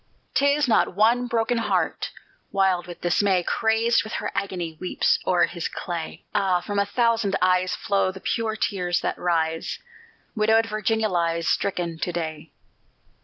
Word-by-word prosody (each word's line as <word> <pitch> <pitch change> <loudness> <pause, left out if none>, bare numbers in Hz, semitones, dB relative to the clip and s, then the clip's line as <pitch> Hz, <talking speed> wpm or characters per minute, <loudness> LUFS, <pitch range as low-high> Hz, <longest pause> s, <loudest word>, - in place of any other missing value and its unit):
'Tis 280 +2 +3
not 220 -5 +2
one 235 +4 +3
broken 235 0 0
heart, 230 - -1 0.4
Wild 190 -3 +1
with 175 - -9
dismay; 180 +1 +2
Crazed 225 +4 +2
with 220 - -8
her - - -3
agony, 175 -5 -3
Weeps 185 - +1
o'er 180 -1 +4
his 170 -3 -4
clay: 170 -2 -6
Ah! 185 -2 +2
from 200 +3 -3
a 200 - +1
thousand 230 -2 +1
eyes 185 0 +2
Flow 195 -1 0
the 190 - -10
pure 220 +3 -1
tears 180 -5 -1
that - - -2
rise; 165 -2 -1 0.6
Widowed 220 +1 +3
Virginia 220 0 0
lies 170 -3 0
Stricken 175 -4 -1
to 175 - -2
day! 160 -2 -5
195 Hz, 150 wpm, -24 LUFS, 175-220 Hz, 0.6 s, o'er